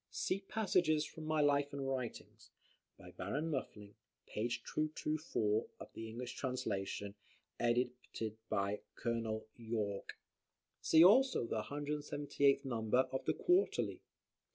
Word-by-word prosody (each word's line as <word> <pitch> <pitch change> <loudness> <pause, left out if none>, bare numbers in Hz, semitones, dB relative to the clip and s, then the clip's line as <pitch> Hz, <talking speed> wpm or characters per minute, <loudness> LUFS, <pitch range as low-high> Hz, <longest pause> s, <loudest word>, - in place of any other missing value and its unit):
[See 190 - -1
"Passages 180 -7 +2
from 155 +1 -9
my 155 0 +2
Life 145 -1 +3
and 140 -1 -3
Writings," 130 -3 -5 0.5
by - - -12
Baron 155 +3 -2
Muffling, 105 -7 -4 0.3
p. 110 +3 -2
224 145 -4 -1
of - - -10
the 115 0 -6
English 125 +2 -5
Translation, 105 -7 -3 0.5
edited 120 -2 -1
by 100 0 0 0.2
Col. 115 -2 -2
Yorke. 110 -4 -3 0.6
See 160 +1 +7
also 250 - +6
the 110 -1 -1
178th 145 -1 +1
number 120 +1 +2
of 130 - -3
the - - +1
QUARTERLY. 360 +3 +2
130 Hz, 115 wpm, -36 LUFS, 110-150 Hz, 0.6 s, See